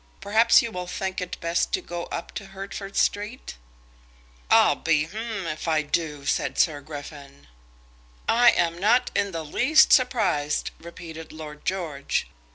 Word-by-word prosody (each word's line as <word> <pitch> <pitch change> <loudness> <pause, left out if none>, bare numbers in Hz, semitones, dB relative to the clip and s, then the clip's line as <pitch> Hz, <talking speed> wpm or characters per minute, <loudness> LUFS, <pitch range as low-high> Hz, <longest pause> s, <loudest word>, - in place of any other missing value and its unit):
Perhaps 225 +3 +4
you 230 - -4
will 180 -3 -5
think 190 +1 -3
it 180 - -5
best 170 +1 0
to 385 - +2
go 175 - -6
up - - -6
to 205 - -6
Hertford 195 +1 -7
Street?" 205 - -1 0.9
"I'll - - +6
be 155 -2 +1
if 195 -9 -4
I 155 -1 +2
do," 150 -1 -2
said 145 - -1
Sir 150 -4 +2
Griffin. 145 -1 -10 0.8
"I 240 +1 +6
am 170 -4 +1
not 220 +6 +3
in 200 - +1
the 165 -2 -5
least 310 - +4
surprised," 205 - +2
repeated 165 -1 -10
Lord 150 -1 -10
George. 165 -7 -2
175 Hz, 145 wpm, -25 LUFS, 155-205 Hz, 0.9 s, I'll